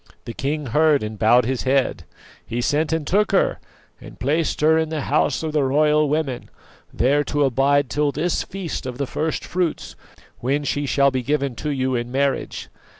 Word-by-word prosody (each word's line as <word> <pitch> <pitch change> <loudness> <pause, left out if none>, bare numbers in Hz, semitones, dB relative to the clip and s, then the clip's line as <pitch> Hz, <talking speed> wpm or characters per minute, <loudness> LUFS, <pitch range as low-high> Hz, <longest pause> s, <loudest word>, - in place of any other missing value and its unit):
"The 115 - -6
king 145 +4 -3
heard 150 +2 +3
and 105 -1 -6
bowed 120 +2 +4
his 130 0 -1
head; 135 0 0 0.4
he 120 - -4
sent 150 +5 0
and 160 -2 -1
took 210 +6 +1
her, - - +2 0.4
and - - -12
placed 155 +2 0
her 155 +1 +5
in 160 -1 +1
the 155 -2 -3
House 150 +3 0
of 160 - -2
the 150 -2 +2
Royal 150 +2 +3
Women, 145 -4 -2 0.4
there 145 +4 +2
to 145 -1 0
abide 135 +2 +2
till 145 +5 0
this 165 +5 -1
feast 185 -8 -5
of 125 -1 -6
the 140 - -1
first 155 +4 -3
fruits, 175 -2 -2 0.4
when 140 +4 -1
she 145 0 -2
shall 140 +2 +3
be 130 -1 -1
given 140 0 -1
to 150 - -3
you 130 -2 -1
in 120 0 -2
marriage. 140 +1 -1
145 Hz, 190 wpm, -22 LUFS, 130-155 Hz, 0.4 s, her